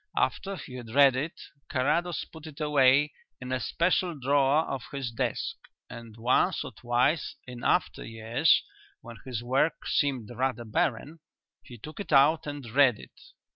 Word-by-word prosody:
After 195 0 0
he 130 -8 -9
had 120 -2 -9
read 140 -2 +6
it 150 +6 -4 0.3
Carrados 155 +6 0
put 160 -1 -12
it 150 -1 -11
away 145 -1 +4 0.3
in 130 0 -7
a 130 - 0
special 175 +3 0
drawer 140 +3 +2
of 135 -2 -3
his 135 -4 -4
desk, 115 - -2 0.3
and 115 -2 -10
once 120 +3 +2
or - - -7
twice 125 +6 0
in 125 -1 -9
after - - +1
years, 115 +7 +2 0.4
when 120 -1 -11
his 120 -3 -4
work 135 +6 0
seemed 130 -6 0
rather 120 -1 -2
barren, 145 +5 -1 0.4
he 120 - -12
took 155 - -10
it 200 -5 -6
out 150 +3 +4
and 145 -2 -6
read 130 -3 +4
it. - - -15
135 Hz, 160 wpm, -28 LUFS, 120-150 Hz, 0.4 s, read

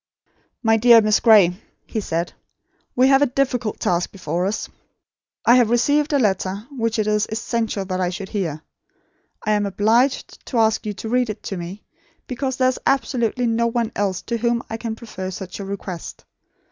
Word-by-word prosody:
"My 225 -1 +4
dear 235 +1 +7
Miss 215 -1 +3
Gray," 200 -5 +5 0.2
he 220 - -3
said, 170 -2 -3 0.6
"we 255 +1 +5
have 270 0 +5
a 290 - +4
difficult 250 -4 -1
task 175 0 0
before 175 -1 -2
us. 210 - -3 0.8
I 235 - +7
have 240 -3 +4
received 285 +6 +2
a 290 - +3
letter, 200 -3 0
which 230 -4 -1
it 215 - +1
is 210 0 +1
essential 220 -2 -2
I 185 -1 0
should 190 +2 -6
hear. 160 -7 -3 0.8
I 215 - +1
am 205 -1 +1
obliged 225 +7 +1
to 250 - -3
ask 220 -1 +2
you 210 - -2
to 220 - -6
read 250 0 +1
it 215 0 -6
to 195 - -4
me, 180 +3 -7 0.4
because 260 0 -3
there 255 -1 +3
is 255 - -3
absolutely 250 -3 0
no 235 0 +1
one 230 -1 -1
else 195 -3 -1
to 235 - -2
whom 235 +1 0
I 225 - -2
can 225 -1 -4
prefer 190 -5 -7
such 190 0 -7
a 200 - -5
request. 195 -3 -7
220 Hz, 185 wpm, -21 LUFS, 195-240 Hz, 0.8 s, dear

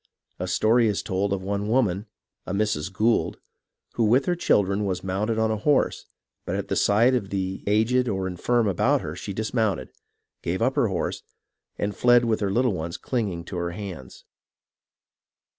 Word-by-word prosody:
A - - -3
story 115 +1 +3
is 105 -2 -1
told 95 0 -1
of 95 -1 -1
one 100 +1 -2
woman, 110 -4 +1 0.4
a 95 - -2
Mrs. 100 -5 -1
Gould, 110 +4 +1 0.6
who, 115 - 0
with 120 +5 +4
her 175 - +1
children, 100 - +2
was 90 -2 -2
mounted 100 +4 -1
on 110 0 +2
a 110 - 0
horse, 140 +7 +1 0.4
but - - -3
at - - -4
the - - 0
sight 115 +5 +4
of 110 -6 -1
the 95 -1 -3
aged 115 +5 +2
or 95 -4 -1
infirm 110 +6 +1
about 95 - +2
her, 75 - -5
she 95 +3 -6
dismounted, 110 -2 -1 0.5
gave - - -2
up - - +1
her - - +3
horse, - - -2 0.6
and 100 0 -2
fled 120 0 +5
with 110 -2 +1
her 100 -2 0
little 120 +3 +2
ones 85 -1 -4
clinging 100 -9 -2
to 90 - -6
her 85 0 -2
hands. 90 -12 -8
105 Hz, 175 wpm, -25 LUFS, 95-115 Hz, 0.6 s, fled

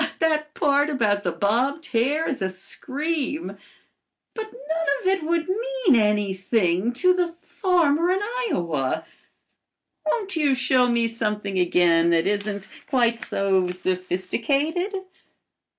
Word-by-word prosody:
That 305 -2 0
part 285 0 +2
about 215 -8 +1
the 175 - -1
bobbed 240 - 0
hair 275 +7 +1
is 275 - -3
a 190 - 0
scream. 295 - -2 0.8
But 440 -1 -6
none 320 +4 -4
of - - -12
it 380 -1 +1
would 330 +1 0
mean 460 - +1
anything 205 -1 +1
to 365 +9 +3
the 350 -2 -1
farmer 345 -4 +2
in 370 - +3 0.3
Iowa. 155 - -1 1.0
Won't 395 +3 -1
you 290 -4 +2
show 255 -1 +3
me 235 -1 +2
something 210 -4 -2
again 170 -1 +3
that 165 0 +2
isn't 205 0 -2 0.2
quite 235 -4 +1
so 190 -2 +1
sophisticated?" 205 - -1
250 Hz, 120 wpm, -24 LUFS, 195-320 Hz, 1.0 s, to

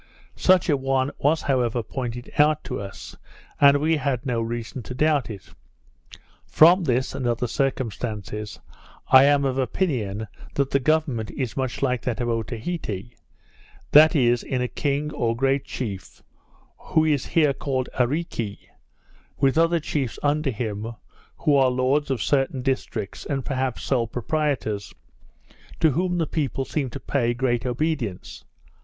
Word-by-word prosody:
Such 185 -1 +4
an 145 -5 +1
one 135 0 +1
was 155 +3 +2
however 120 -3 0
pointed 120 0 -5
out 150 0 +4
to - - -4
us; 100 -1 -8 0.4
and 140 0 +7
we 155 +2 +1
had 135 -2 -2
no 120 -3 0
reason 115 +2 -4
to 125 +3 -8
doubt 150 -2 +2
it. 100 -4 -8 1.0
From 175 +4 +5
this, 130 -1 0
and 130 - -2
other 120 +1 0
circumstances, 110 -5 -3 0.5
I 130 +1 +8
am 140 -1 +3
of 135 0 0
opinion 115 - -1 0.3
that 140 -1 0
the 140 - +3
government 140 -6 0
is 130 -5 -4
much 130 0 -2
like 125 -3 +1
that 125 -3 -3
of 120 -1 -1
Otaheite: 115 - -4 0.8
That 155 +3 +7
is, 120 -4 +3
in 130 - -2
a 125 - 0
king 145 +3 -2
or 115 -1 0
great 135 +2 +1
chief, 100 -7 -6 0.6
who 160 0 +1
is 145 -4 +1
here 150 -4 +3
called 130 -2 -2
Areeke, 125 -6 -1 0.8
with 135 0 +2
other 165 +1 +3
chiefs 140 -6 -3
under 145 0 +1
him, 110 -1 -4 0.4
who 150 - +2
are 135 -2 +5
lords 130 +4 +1
of 130 -5 -1
certain 135 -2 0
districts, 120 -6 -3
and 135 -3 -3
perhaps 130 -3 -2
sole 120 -4 +1
proprietors, 125 -4 -2 0.8
to 160 - +4
whom 180 +5 0
the 165 - +1
people 140 -3 -2
seem 140 -3 -2
to 130 - -7
pay 120 -3 0
great 120 -1 0
obedience. 125 - -3
130 Hz, 150 wpm, -24 LUFS, 120-145 Hz, 1.0 s, I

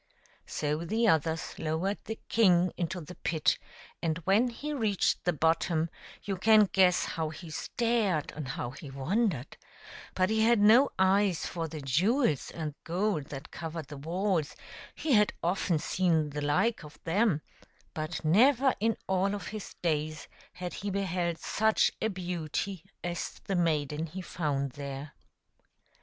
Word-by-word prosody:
So 150 0 -1
the 225 +6 +1
others 160 -2 +1
lowered 165 +6 -1
the 220 - -5
king 180 -5 +4
into 175 +1 -3
the 165 +3 -9
pit, 160 -3 +1 0.4
and 160 -2 0
when 210 +6 +4
he 285 +5 -5
reached 220 -8 +1
the 175 - +2
bottom 160 +1 +1 0.3
you 195 -2 -2
can 215 +2 +6
guess 185 -2 +4
how 160 -1 -2
he 160 +1 -9
stared 220 -5 0
and 150 -3 -6
how 120 -1 -4
he 140 +2 -10
wondered; 150 - -1 0.6
but 185 +2 +2
he 220 0 +2
had 235 +2 +5
no 230 +7 +6
eyes 190 -1 +3
for 165 -2 -3
the 155 -1 -7
jewels 160 - +2
and 155 -3 -5
gold 175 -3 0
that 140 0 -8
covered 165 -2 -6
the 145 - -7
walls; 170 +1 -1 0.4
he 310 - -2
had 210 -2 +4
often 175 -1 +1
seen 160 -2 +1
the 150 +1 -4
like 150 +9 +1
of 150 0 -12
them, 180 -2 +2 0.5
but 155 +1 -4
never 255 - +5
in 225 +1 +1
all 190 +1 +1
of 200 - -6
his 215 -2 -7
days 155 -2 -1 0.3
had 180 -2 -5
he 205 - -4
beheld 180 -3 -1
such 220 +5 +2
a 220 - +2
beauty 180 -1 -3 0.2
as 175 -1 -4
the 195 - -1
maiden 155 -2 0
he 185 +4 -7
found 140 -6 -2
there. 140 +1 -7
175 Hz, 150 wpm, -30 LUFS, 155-205 Hz, 0.6 s, can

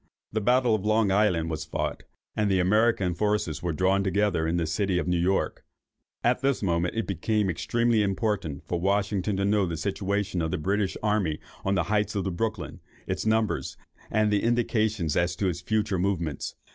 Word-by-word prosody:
The 110 - 0
battle 125 +2 +3
of 105 -3 0
Long 110 -1 +2
Island 90 -5 +2
was 80 -1 -3
fought, - - -3 0.3
and 105 -1 +1
the 95 -1 +2
American 100 0 +2
forces 105 -4 -1
were 85 - -1
drawn 95 +4 +2
together 100 -4 +1
in 85 +2 0
the 85 - 0
city 95 +3 0
of 90 - -1
New 90 -1 +1
York. 95 +3 0 0.6
At 125 +1 +2
this 135 -4 +1
moment 85 0 0
it 115 - 0
became 100 +2 0
extremely 115 +5 +1
important 95 -6 -1
for 85 - -1
Washington 100 0 0
to 100 - +1
know 100 -1 +2
the 85 -1 -3
situation 100 0 -1
of 80 - -1
the 90 - -1
British 95 +4 -1
army 105 -8 +1 0.2
on 95 0 +1
the 90 - +2
heights 105 +3 0
of 95 -3 -2
Brooklyn, 110 +3 -3 0.3
its - - -2
numbers, 110 -1 0 0.3
and 110 -1 +2
the 100 - +2
indications 110 -7 +1
as 85 +1 +1
to 100 - -1
its 85 0 -4
future 105 -1 0
movements. 85 -7 -2
100 Hz, 185 wpm, -27 LUFS, 90-105 Hz, 0.6 s, battle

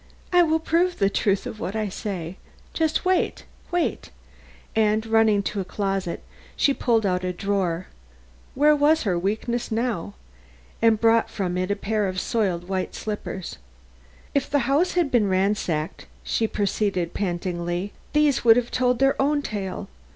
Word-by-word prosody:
I 355 - +7
will 320 -2 +3
prove 340 +3 +1
the 195 -1 +2
truth 200 -1 +1
of 215 - -6
what 195 - -4
I 215 -1 -1
say. 185 -3 -5 0.7
Wait 370 0 +1 0.2
wait!" 350 -1 -1 0.7
and 215 0 +2
running 220 -2 +3
to 205 - -3
a - - -1
closet, 195 -2 -3 0.3
she 280 - +3
pulled 230 -5 +1
out 180 -1 0
a 180 - -1
drawer 185 -2 -1 0.7
where 300 +2 +5
was 300 +2 +3
her 180 -5 0
weakness 220 +6 -2
now? 220 - -2 0.7
and 225 -1 +4
brought 230 0 +3
from 180 -3 -2
it 185 +1 -1
a 205 - +1
pair 210 0 -1
of 185 0 -2
soiled 185 -5 -1
white 190 -1 -2
slippers. 205 -3 -5 0.7
"If 280 - 0
the 285 -4 +1
house 295 +7 +2
had 345 -6 +1
been 220 -5 +3
ransacked," 185 -5 -1 0.2
she 225 - 0
proceeded 200 -4 -1
pantingly, 175 0 -2 0.2
"these 295 -4 +3
would 230 -1 +7
have 245 -1 -1
told 250 -1 +2
their 270 +1 +2
own 290 +1 +1
tale. 195 -6 -4
210 Hz, 155 wpm, -24 LUFS, 185-250 Hz, 0.7 s, I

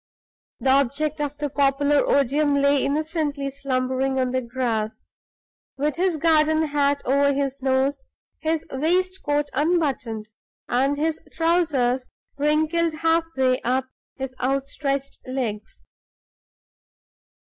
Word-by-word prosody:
The 265 - +2
object 280 +3 +1
of 290 0 -3
the 295 0 -2
popular 285 +1 +2
odium 285 +2 +2
lay 280 0 +3
innocently 290 -1 -1
slumbering 265 -1 -1
on 255 -1 0
the 260 0 0
grass, 230 -3 -3 0.7
with 295 +2 0
his 360 -2 +1
garden 315 0 +3
hat 285 -1 +1
over 280 +2 +3
his 275 0 -2
nose, 270 - 0 0.3
his 320 0 -1
waistcoat 315 0 0
unbuttoned, 265 -8 -1 0.4
and 270 +4 +1
his 315 +1 0
trousers 300 -7 +1 0.3
wrinkled 315 +3 +2
half 325 +1 +2
way 255 -1 +2
up 260 +1 0 0.3
his 265 -1 -5
outstretched 275 +1 -2
legs. 230 -5 -4
280 Hz, 110 wpm, -23 LUFS, 260-305 Hz, 0.7 s, lay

